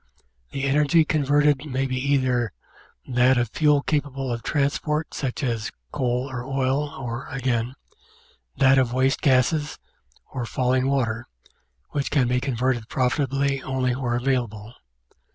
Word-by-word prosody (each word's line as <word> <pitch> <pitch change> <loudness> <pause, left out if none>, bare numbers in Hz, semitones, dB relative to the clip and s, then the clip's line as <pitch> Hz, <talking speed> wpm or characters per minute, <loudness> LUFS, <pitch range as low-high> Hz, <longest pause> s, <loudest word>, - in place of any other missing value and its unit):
The 135 - -4
energy 150 +3 +3
converted 145 -1 +2
may 135 -1 -1
be 130 -1 -2
either 130 -5 +1 0.5
that 125 +1 +3
of 120 -2 +1
fuel 150 0 +3
capable 135 -3 -1
of 115 - -4
transport 150 +3 -1
such 135 0 -3
as 115 -4 -2 0.2
coal 125 -2 -1
or 125 -3 -5
oil 135 +2 0
or, 120 -3 -6
again, 125 -2 -1 0.8
that 135 0 +5
of 125 -2 +1
waste 130 +1 +2
gases 140 +3 +2 0.5
or 120 -2 -4
falling 130 +1 +1
water, 120 -4 0 0.6
which 140 -1 -1
can 135 -4 +2
be 125 +1 +1
converted 125 -3 -1
profitably 135 +1 0
only 130 -2 -1
where 125 -2 -1
avail 125 0 +1
able. 105 +1 -11
130 Hz, 135 wpm, -24 LUFS, 125-140 Hz, 0.8 s, that